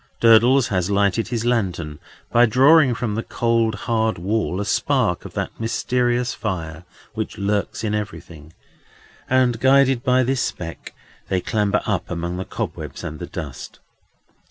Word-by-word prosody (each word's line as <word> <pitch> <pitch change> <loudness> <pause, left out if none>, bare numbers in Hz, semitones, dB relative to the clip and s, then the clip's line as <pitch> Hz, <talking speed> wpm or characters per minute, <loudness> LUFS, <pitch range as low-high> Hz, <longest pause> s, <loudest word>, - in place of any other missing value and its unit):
Durdles 120 +3 +5
has 90 -2 0
lighted 100 +2 +1
his 115 -2 -3
lantern, 90 -11 -1 0.3
by 120 +1 +5
drawing 135 +3 +5
from 115 -2 -2
the 110 - -1
cold, 115 -2 0
hard 110 -1 0
wall 95 -1 -1
a 105 - -2
spark 100 - 0
of - - -10
that - - -4
mysterious 120 +2 0
fire 85 -5 -5 0.3
which 110 -1 -4
lurks 100 +2 -2
in 105 -1 -1
everything, 85 -7 -6 0.8
and, 125 -3 +2
guided 135 -1 +4
by 130 -1 +3
this 130 +1 0
speck, 85 -2 -5 0.3
they 95 - +1
clamber 105 +1 0
up 95 -5 -2
among 85 0 -3
the 95 - -4
cobwebs - - -6
and 75 - -6
the - - -6
dust. - - -8
110 Hz, 150 wpm, -21 LUFS, 95-120 Hz, 0.8 s, Durdles